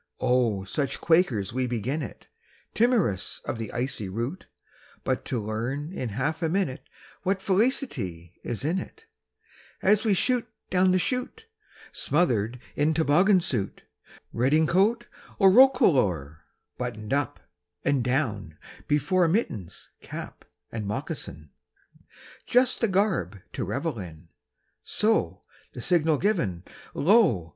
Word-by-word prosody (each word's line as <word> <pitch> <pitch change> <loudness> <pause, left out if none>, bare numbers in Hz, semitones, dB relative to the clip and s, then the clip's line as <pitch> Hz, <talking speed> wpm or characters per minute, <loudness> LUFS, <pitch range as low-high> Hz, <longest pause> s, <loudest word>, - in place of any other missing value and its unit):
Oh, 120 -6 +2
such 140 +8 -2
quakers 130 - +2
we 130 0 0
begin 125 +6 -2
it, 120 - -8 0.5
Timorous 215 - +1
of - - -3
the 110 -2 -5
icy 120 -5 -2
route! 120 - -4 0.6
But - - -1
to 125 - -2
learn 120 - -3
in 125 -9 -3
half 145 - -2
a 165 - +1
minute 170 -7 -1 0.4
What 190 +1 0
felicity 185 - -1
is 120 +3 -4
in 175 +5 +1
it, 440 - -10 0.8
As 210 +2 +4
we 215 -4 +3
shoot 245 +5 +1 0.2
down 185 0 +4
the 185 - +4
chute, 255 - -2 0.5
Smothered 125 - 0 0.2
in 150 +2 +2
toboggan 175 +5 +4
suit, 120 - -2 0.5
Redingote 170 - +2 0.3
or 195 -2 +6
roquelaure, 130 - +4 0.3
Buttoned 105 +3 -4
up 140 -2 -1 0.5
(and 135 -3 +2
down) 110 - -1 0.3
before, 150 +5 +2
Mittens, 140 - -2
cap, - - -8 0.3
and 110 -3 -4
moccasin, 80 -7 -5 1.0
Just 250 +1 +3
the 230 - +3
garb 185 - 0
to - - -3
revel 130 - -3
in; 85 -3 -10 0.5
So, 220 +1 0 0.3
the - - -7
signal 160 -4 +2
given, 140 - 0 0.3
lo! 145 - +3
145 Hz, 120 wpm, -26 LUFS, -, 1.0 s, or